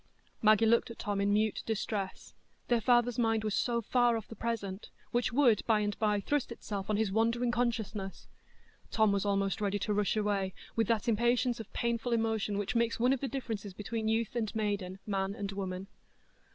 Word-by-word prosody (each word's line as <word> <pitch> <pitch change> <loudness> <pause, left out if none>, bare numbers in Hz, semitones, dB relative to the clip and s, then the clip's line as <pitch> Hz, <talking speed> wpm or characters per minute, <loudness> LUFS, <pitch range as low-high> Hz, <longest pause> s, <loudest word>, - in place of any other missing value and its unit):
Maggie 215 0 +5
looked 235 +2 +3
at 230 - -8
Tom 205 -3 -2
in 200 0 +2
mute 215 +1 +1
distress, 210 -3 -3 0.4
their 240 -2 +3
father's 240 +1 +3
mind 225 -2 +2
was 215 -2 -1
so 235 +1 0
far 240 0 +3
off 220 - -7
the 225 - -9
present, 205 -3 -4 0.2
which 240 -1 +1
would 240 -5 +4
by 220 -2 +4
and 205 -1 -1
by 210 -2 +2
thrust 280 +5 -1
itself 205 -4 -5
on 210 - +2
his 215 -2 +1
wandering 230 +3 +1
consciousness! 220 -5 -2 0.6
Tom 220 -2 +3
was 200 0 0
almost 195 0 0
ready 205 0 +1
to 210 +1 -1
rush 205 +1 +1
away, 200 -3 0 0.2
with 225 -2 +2
that 225 +1 0
impatience 240 +2 +2
of 225 - -8
painful 235 0 -1
emotion 220 -3 0
which 205 +3 -2
makes 235 -1 +1
one 250 +3 +4
of 270 - -1
the 275 - -2
differences 220 -7 -5
between 220 +2 -3
youth 225 +1 0
and 225 -3 -2
maiden, 205 -4 -2
man 195 -1 -1
and 200 -3 -4
woman. 190 -1 -4
220 Hz, 190 wpm, -31 LUFS, 200-235 Hz, 0.6 s, Maggie